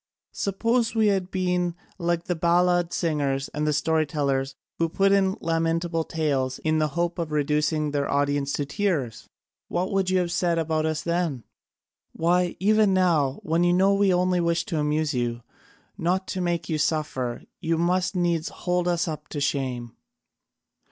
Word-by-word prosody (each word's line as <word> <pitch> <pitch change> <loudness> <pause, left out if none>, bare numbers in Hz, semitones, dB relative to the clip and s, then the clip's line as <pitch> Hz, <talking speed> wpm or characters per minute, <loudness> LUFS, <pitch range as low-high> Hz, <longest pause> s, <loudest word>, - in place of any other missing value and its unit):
Suppose 230 +4 0
we 220 -2 +4
had 190 -2 0
been 180 -2 0 0.2
like 170 -1 0
the 180 - -1
ballad 175 +1 +2
singers 140 -4 -1
and 150 +1 -1
story 155 +1 +1
tellers 135 -2 -1 0.2
who 165 0 +1
put 195 +4 +2
in 195 -1 +3
lamentable 165 0 0
tales 135 -5 -1
in 155 0 0
the 155 - +2
hope 175 +1 0
of 165 -2 -3
reducing 150 +1 0
their 145 -1 -1
audience 145 0 0
to 145 - -1
tears! 145 - -2 0.4
What 180 +2 -2
would 195 -2 +1
you 185 - +2
have 175 -2 0
said 170 -1 +1
about 160 -1 0
us 155 -1 -2
then? 170 -7 -1 0.7
Why, 175 +1 +1
even 210 0 +3
now, 160 -8 +2
when 165 +2 +1
you 175 0 +3
know 190 +2 +4
we 200 -1 +3
only 180 0 +2
wish 170 0 0
to 170 -8 -2
amuse 150 0 0
you, 120 -1 -2 0.6
not 185 +3 0
to 185 - -2
make 175 -1 -1
you 155 -2 -1
suffer, 130 -6 -1 0.2
you 165 -1 0
must 180 +3 +1
needs 170 -3 0
hold 180 0 -1
us 175 -1 +1
up 155 -1 -5
to 150 - -5
shame." 130 -5 -2
165 Hz, 165 wpm, -25 LUFS, 150-180 Hz, 0.7 s, we